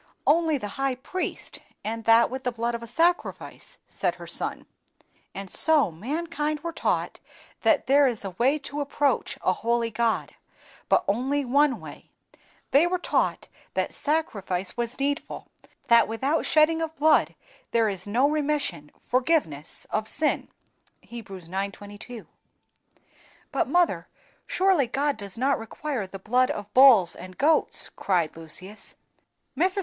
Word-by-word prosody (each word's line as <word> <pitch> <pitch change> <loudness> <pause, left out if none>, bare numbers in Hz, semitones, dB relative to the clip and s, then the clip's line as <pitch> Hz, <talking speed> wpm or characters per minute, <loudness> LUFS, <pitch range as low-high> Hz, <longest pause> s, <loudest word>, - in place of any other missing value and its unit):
"Only 320 0 +3
the 210 +1 -6
high 270 -1 +1
priest, 360 +8 -5 0.2
and 225 +1 -4
that 230 +1 +5
with 260 0 -5
the 250 - 0
blood 235 0 -2
of 235 - -4
a 235 - -8
sacrifice," 335 +9 -1
said - - -1
her - - -10
son. - - -3 0.7
"And 195 0 -6
so 300 - +3
mankind 300 - -3
were 335 +1 -4
taught - - -1 0.4
that - - +3
there 280 +1 +5
is 230 -5 -3
a 195 - -4
way 250 - +2
to 290 +1 -4
approach 285 -1 0
a 185 - +3
holy 230 +2 0
God, 230 0 0 0.6
but - - +4
only 265 +7 0
one 270 -1 +3
way; 155 -3 -12 0.6
they 295 +5 +5
were 365 +1 0
taught 350 - -1 0.3
that - - -1
sacrifice 200 - -1
was 240 +2 -3
needful, 285 +2 -3 0.3
that 235 -3 +5
WITHOUT 265 +8 -1
SHEDDING 315 +1 +4
OF 320 0 -3
BLOOD 310 0 +3 0.3
THERE 230 -2 +2
IS 195 0 -6
NO 245 +7 +3
REMISSION 295 - -1 0.2
(forgiveness 250 - 0
of 215 0 -1
sin), 305 +5 0 0.6
Heb. 235 -4 -9
ix. 185 -4 -9
22. 205 +4 -6 1.3
"But, - - 0
mother, 350 -1 +1 0.4
surely 370 -8 +2
God 285 +4 0
does 200 -1 -9
not 270 +3 +1
require 225 0 -4
the 195 - -8
blood 245 +6 +2
of 205 0 -5
bulls 245 -10 +7
and 185 0 -11
goats!" 310 +3 +2
cried 175 -5 0
Lucius. 185 +6 -8 0.6
Mrs. 370 +4 +1
250 Hz, 145 wpm, -26 LUFS, 205-295 Hz, 1.3 s, bulls